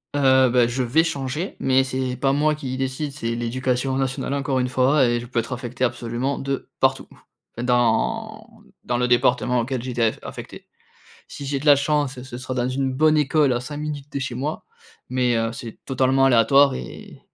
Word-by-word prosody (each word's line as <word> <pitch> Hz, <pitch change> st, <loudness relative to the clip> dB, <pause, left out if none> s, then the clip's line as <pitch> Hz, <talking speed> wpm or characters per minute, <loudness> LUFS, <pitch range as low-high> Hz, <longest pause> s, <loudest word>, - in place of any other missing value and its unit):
Heu, 130 Hz, -2 st, +4 dB
bah 120 Hz, -1 st, +4 dB
je 120 Hz, +2 st, -2 dB
vais 135 Hz, +7 st, +3 dB
changer, 150 Hz, +2 st, -3 dB
mais 130 Hz, 0 st, +3 dB
c'est 130 Hz, -1 st, -3 dB
pas 135 Hz, -1 st, +2 dB
moi 150 Hz, +1 st, +2 dB
qui 130 Hz, -4 st, -5 dB
décide, 135 Hz, +2 st, -3 dB
c'est 115 Hz, -5 st, -3 dB
l’Éducation 125 Hz, +2 st, -1 dB
Nationale, 135 Hz, 0 st, -2 dB
encore 135 Hz, -1 st, -1 dB
une 125 Hz, -, 0 dB
fois, 130 Hz, +2 st, +3 dB
et 120 Hz, 0 st, +1 dB
je 120 Hz, -, -8 dB
peux 120 Hz, -, -7 dB
être 115 Hz, +2 st, -1 dB
affecté 125 Hz, 0 st, -5 dB
absolument 120 Hz, +3 st, -2 dB
de 135 Hz, 0 st, -3 dB
partout. -, -, +1 dB
Enfin, 120 Hz, -, -12 dB
dans 215 Hz, -, -1 dB, 0.2 s
dans 120 Hz, -, -1 dB
le 125 Hz, 0 st, +1 dB
département 125 Hz, 0 st, +2 dB
auquel 125 Hz, 0 st, -2 dB
j'ai 130 Hz, -, -4 dB
été 120 Hz, -1 st, -2 dB
a 115 Hz, -1 st, +4 dB
affecté. -, -, -9 dB, 0.6 s
Si 140 Hz, -, -8 dB
j'ai 140 Hz, 0 st, -1 dB
de 150 Hz, -, -8 dB
la 145 Hz, -, +8 dB
chance, 140 Hz, -2 st, -1 dB
ce 125 Hz, -1 st, -8 dB
sera 130 Hz, 0 st, -5 dB
dans 125 Hz, 0 st, -1 dB
une 130 Hz, 0 st, -1 dB
bonne 155 Hz, +3 st, +3 dB
école 150 Hz, -1 st, +3 dB
à 120 Hz, -, -1 dB
5 145 Hz, +4 st, -7 dB
minutes 150 Hz, -2 st, -5 dB
de 140 Hz, -, -2 dB
chez 130 Hz, -2 st, -4 dB
moi, 145 Hz, +5 st, -4 dB, 0.4 s
mais, 125 Hz, -2 st, +1 dB
heu, 115 Hz, 0 st, 0 dB
c'est 115 Hz, -1 st, -9 dB
totalement 135 Hz, 0 st, +2 dB
aléatoire 135 Hz, +3 st, +5 dB
et 65 Hz, -1 st, -9 dB
130 Hz, 200 wpm, -22 LUFS, 125-140 Hz, 0.6 s, la